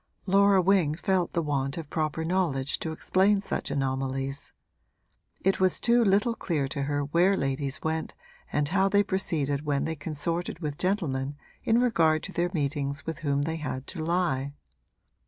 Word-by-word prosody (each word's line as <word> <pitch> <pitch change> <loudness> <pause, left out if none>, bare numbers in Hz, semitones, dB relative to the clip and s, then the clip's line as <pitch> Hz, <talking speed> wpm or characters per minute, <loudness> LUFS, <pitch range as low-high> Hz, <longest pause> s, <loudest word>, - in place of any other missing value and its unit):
Laura 200 0 +5
Wing 180 -5 +3
felt 185 0 0
the 170 - 0
want 140 -1 -1
of 165 -3 -5
proper 160 0 -1
knowledge 160 -7 0
to 160 - -3
explain 190 +5 +2
such 195 - -3
anomalies. 135 0 -2 0.9
It 195 +1 +1
was 185 -1 +2
too 240 0 +4
little 205 +3 +3
clear 160 -10 -1
to 140 - -3
her 145 0 0
where 175 +7 +3
ladies 135 0 -2
went 160 0 -2 0.4
and 150 -1 +1
how 190 +4 +2
they 205 +1 +4
proceeded 155 -8 -1
when 145 -2 0
they 160 - -2
consorted 165 +4 -3
with 150 -4 -5
gentlemen 145 -8 -1 0.3
in 230 +1 +3
regard 165 -11 +3
to 190 - -6
their 175 -1 0
meetings 140 -3 -2
with 165 -1 -4
whom 140 -3 0
they 160 +2 -2
had 135 -4 -4
to 165 -4 -5
lie. 155 -5 0
160 Hz, 165 wpm, -27 LUFS, 140-190 Hz, 0.9 s, Laura